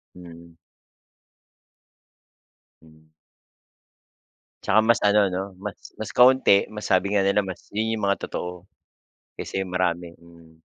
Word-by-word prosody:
Mm. 85 Hz, -1 st, -13 dB, 2.3 s
Hmm. 80 Hz, 0 st, -22 dB, 1.5 s
'Tsaka 110 Hz, -, +3 dB
mas 115 Hz, +2 st, +4 dB
ano 105 Hz, 0 st, +4 dB
no, 95 Hz, +1 st, -3 dB, 0.2 s
mas -, -, -9 dB
mas -, -, -6 dB
kaunti, 125 Hz, -5 st, +5 dB
mas 105 Hz, 0 st, -6 dB
sabi 95 Hz, 0 st, +1 dB
nga 105 Hz, -, +2 dB
nila, 100 Hz, +1 st, +2 dB
mas 95 Hz, -1 st, -9 dB
yun 110 Hz, +1 st, 0 dB
yung 110 Hz, -3 st, -1 dB
mga 100 Hz, -, -1 dB
totoo. 90 Hz, 0 st, -6 dB, 0.7 s
Kaysa -, -, -5 dB
yung 95 Hz, -1 st, -4 dB
marami, 85 Hz, -2 st, -1 dB
hmm. 85 Hz, -1 st, -20 dB
95 Hz, 120 wpm, -24 LUFS, 85-105 Hz, 2.3 s, kaunti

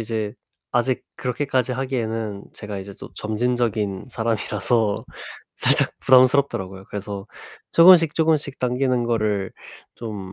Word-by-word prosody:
이제 110 Hz, -2 st, -3 dB, 0.4 s
아직 120 Hz, +1 st, 0 dB
그렇게까지 130 Hz, 0 st, -1 dB
하기에는 115 Hz, -5 st, -3 dB
제가 105 Hz, -1 st, -7 dB
이제 95 Hz, +1 st, -9 dB
또 -, -, -10 dB
점진적인 110 Hz, -3 st, -1 dB
사람이라서 110 Hz, -1 st, 0 dB, 0.5 s
살짝 -, -, +4 dB
부담스럽더라고요. 130 Hz, -8 st, +3 dB
그래서 100 Hz, -1 st, -6 dB, 0.5 s
쪼금씩 165 Hz, -2 st, +7 dB
쪼금씩 155 Hz, -3 st, +1 dB
당기는 125 Hz, 0 st, 0 dB
거를 110 Hz, -5 st, -1 dB, 0.4 s
좀 105 Hz, -5 st, -7 dB
115 Hz, 300 characters per minute, -22 LUFS, 105-130 Hz, 0.5 s, 쪼금씩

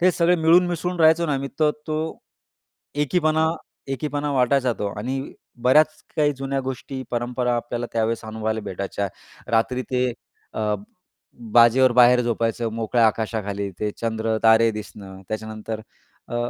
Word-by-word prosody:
ते 185 Hz, +1 st, +5 dB
सगळे 175 Hz, +1 st, +3 dB
मिळून 170 Hz, +2 st, +5 dB
मिसळून 175 Hz, +1 st, -3 dB
राहायचो 160 Hz, +1 st, +5 dB
ना, 150 Hz, -, 0 dB
आम्ही 135 Hz, 0 st, -3 dB
तर 150 Hz, -1 st, +5 dB, 0.2 s
तो, 155 Hz, 0 st, -3 dB, 0.8 s
एकीपणा 155 Hz, +1 st, +2 dB, 0.4 s
एकीपणा 145 Hz, +1 st, -2 dB
वाटायचा 130 Hz, -1 st, +2 dB
तो 105 Hz, -, -2 dB
आणि 130 Hz, +5 st, -2 dB, 0.4 s
बऱ्याच 150 Hz, +6 st, +6 dB, 0.3 s
काही 150 Hz, -1 st, +3 dB
जुन्या 135 Hz, 0 st, -2 dB
गोष्टी 130 Hz, 0 st, -5 dB
परंपरा 125 Hz, 0 st, -1 dB
आपल्याला 120 Hz, 0 st, -3 dB
त्यावेळेस 115 Hz, 0 st, -1 dB
अनुभवायला 110 Hz, 0 st, -3 dB
भेटायच्या. 100 Hz, 0 st, -3 dB, 0.4 s
रात्री 125 Hz, +3 st, +1 dB
ते 125 Hz, 0 st, +1 dB, 0.5 s
अ, 105 Hz, -1 st, 0 dB, 0.8 s
बाजेवर 120 Hz, +2 st, +6 dB
बाहेर 125 Hz, 0 st, +6 dB
झोपायचं 115 Hz, 0 st, -1 dB
मोकळ्या 115 Hz, +1 st, +2 dB
आकाशाखाली 105 Hz, -2 st, -2 dB
ते 105 Hz, -, 0 dB
चंद्र 110 Hz, -1 st, -1 dB
तारे 110 Hz, 0 st, +6 dB
दिसणं 95 Hz, -2 st, -9 dB
त्याच्यानंतर 110 Hz, 0 st, -5 dB, 0.5 s
अ, -, -, -6 dB
120 Hz, 135 wpm, -23 LUFS, 110-145 Hz, 0.8 s, बऱ्याच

